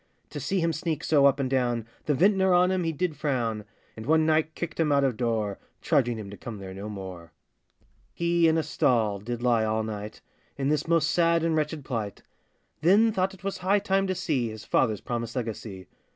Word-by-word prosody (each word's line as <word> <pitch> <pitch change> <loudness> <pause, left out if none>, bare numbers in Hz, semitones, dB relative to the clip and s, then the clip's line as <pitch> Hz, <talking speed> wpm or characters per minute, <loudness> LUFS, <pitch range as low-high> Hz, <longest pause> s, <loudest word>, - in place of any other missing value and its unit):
To - - -5
see 195 -2 -1
him 165 0 +1
sneak 160 0 -3
so 140 -3 +5
up 140 0 +2
and 135 - 0
down, 120 -3 0 0.2
The 150 - +2
vintner 190 +3 +4
on 180 +1 +4
him 185 -1 0
he 165 - +1
did 160 +1 -2
frown; 115 -8 -2 0.3
And 110 +1 -8
one 160 0 +4
night 155 0 +1
kicked 170 -2 -5
him 155 -2 +2
out 140 -1 +3
of 130 -4 +1
door, 110 -4 -1 0.2
Charging 120 -6 +1
him 100 -2 -7
to 100 - -9
come 115 -3 -7
there 95 -1 -8
no 100 +2 -7
more. 95 -5 -8 0.8
He 170 -1 +2
in 160 0 +3
a 160 - +1
stall 110 -9 +1
did 120 +3 -5
lie 120 -3 +3
all 110 0 0
night, 105 0 -6 0.4
In 135 0 0
this 150 +1 0
most 165 -2 +2
sad 170 -1 +3
and 165 -1 +1
wretched 150 -2 -2
plight; 110 -5 -4 0.6
Then 205 +7 +5
thought 195 -1 -1
it 180 - -20
was 195 -1 -3
high 190 +3 +2
time 195 -1 +1
to 185 - -1
see 145 -10 -1
His 110 -1 -9
father's 110 -5 +1
promised 115 -1 -4
legacy. 110 -5 -5
140 Hz, 210 wpm, -27 LUFS, 110-170 Hz, 0.8 s, so